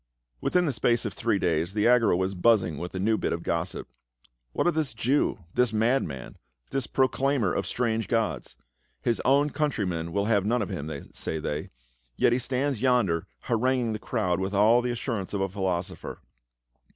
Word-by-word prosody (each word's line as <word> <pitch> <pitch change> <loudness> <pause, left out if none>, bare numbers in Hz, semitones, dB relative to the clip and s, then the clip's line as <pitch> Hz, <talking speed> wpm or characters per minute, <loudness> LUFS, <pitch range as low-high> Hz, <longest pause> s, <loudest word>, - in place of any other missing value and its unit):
Within 180 -1 +2
the 150 - +1
space 120 0 +1
of - - -3
three 115 -4 0
days 85 +1 0
the 105 +1 +3
Agora 120 -6 +4
was 95 +1 -1
buzz 105 +2 +4
ing 80 -5 -5
with 90 +2 -6
a - - -2
new 110 +3 +1
bit - - -1
of 85 0 -4
gossip. 85 +2 -2 0.6
"What - - -1
of 175 - +3
this 155 -6 -1
Jew 125 -3 +1
— 85 - -31
this 125 -3 +2
madman 110 - -1 0.2
— - - -44
this 135 -4 -1
proclaimer 130 -5 +1
of - - -2
strange 115 -2 -1
gods? 115 -2 -1 0.5
His 115 - +1
own 140 +3 +3
countrymen 95 - -1
will 100 +3 0
have 105 -3 +2
none 115 +2 +1
of 95 - -6
him, 75 +2 -4 0.2
say 80 - -3
they, 75 0 -4 0.5
yet 120 - +3
he 125 - +2
stands 130 -1 -1
yonder 120 -11 +2
haranguing 120 0 +1
the 110 - -4
crowd 100 -6 -1
with 95 +1 -2
all 110 +4 +5
the 125 - -2
assurance 115 -5 -3
of 100 - -1
a 95 - 0
philosopher." 95 -1 -3
110 Hz, 190 wpm, -27 LUFS, 95-125 Hz, 0.6 s, all